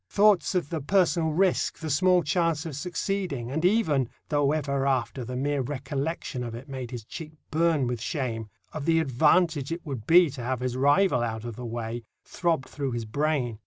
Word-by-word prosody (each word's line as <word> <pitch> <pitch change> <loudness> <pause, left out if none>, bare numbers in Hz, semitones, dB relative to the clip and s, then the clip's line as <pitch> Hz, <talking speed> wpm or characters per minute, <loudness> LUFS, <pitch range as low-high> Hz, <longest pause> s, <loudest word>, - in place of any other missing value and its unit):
Thoughts 205 -2 +4
of 175 -5 0
the 160 -3 -2
personal 170 0 +2
risk, 180 +4 +1
the 160 -2 -4
small 180 +4 +4
chance 165 0 0
of 160 -4 -5
succeeding, 175 -5 -3
and 160 +4 -2
even—though 145 - +1
ever 140 -3 0
after 130 -1 0
the 125 +2 -5
mere 140 +2 0
recollection 135 +1 -3
of 115 -1 -5
it 125 +5 -9
made 130 -3 -6
his 120 -3 -6
cheek 155 +6 -8 0.2
burn 160 -3 +2
with 120 -2 -3
shame—of 120 - -5
the 165 0 +4
advantage 155 +1 +2
it 170 +1 -4
would 130 -7 -6
be 170 -2 +6
to 130 -2 -7
have 125 +1 -2
his 125 -1 -2
rival 145 +2 +3
out 110 -1 -3
of 120 -2 -5
the 125 +1 -6
way, 115 0 -4 0.2
throbbed 165 -7 -1
through 140 -4 -3
his 120 -1 -3
brain. 130 -2 -1
145 Hz, 185 wpm, -27 LUFS, 125-165 Hz, 0.2 s, be